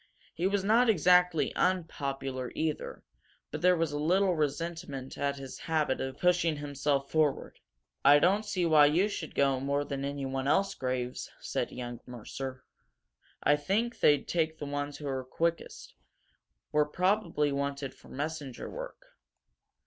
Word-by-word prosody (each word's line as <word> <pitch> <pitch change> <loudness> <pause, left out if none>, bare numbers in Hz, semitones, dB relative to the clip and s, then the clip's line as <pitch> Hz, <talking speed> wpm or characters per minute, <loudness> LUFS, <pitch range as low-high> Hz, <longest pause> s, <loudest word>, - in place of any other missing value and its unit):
He 175 +3 0
was 200 0 0
not 230 +4 +4
exactly 180 -3 +4
unpopular, 135 -7 -1
either; 155 -1 -3 0.5
but 155 - -5
there 180 0 +5
was 165 -2 0
a 145 - -3
little 185 +5 +3
resentment 150 -2 -3
at 140 0 -1
his 135 -2 -8
habit 155 -4 0
of 130 0 -4
pushing 175 -2 +2
himself 140 -1 -1
forward. 155 -3 0 0.4
"I 145 +1 +8
don't 190 +8 +3
see 185 -4 -1
why 155 -3 +6
you 170 +7 +3
should 175 -6 -6
go 135 -2 +2
more 140 +2 -1
than 140 -1 -4
anyone 135 -1 -3
else, 195 +7 +2
Graves," 125 -1 -3
said - - -3
young 120 -1 -6
Mercer. 130 +2 -7 0.8
"I 145 - +5
think 205 +11 -1
they'd 145 -2 +4
take 160 -2 0
the 150 - -5
ones 145 0 -3
who 145 - -6
are 130 -1 -2
quickest. 165 +6 -3 0.8
We're 150 0 +3
probably 175 -2 +1
wanted 140 -1 -3
for - - -18
messenger 145 -2 -5
work." - - -8
150 Hz, 150 wpm, -30 LUFS, 140-175 Hz, 0.8 s, I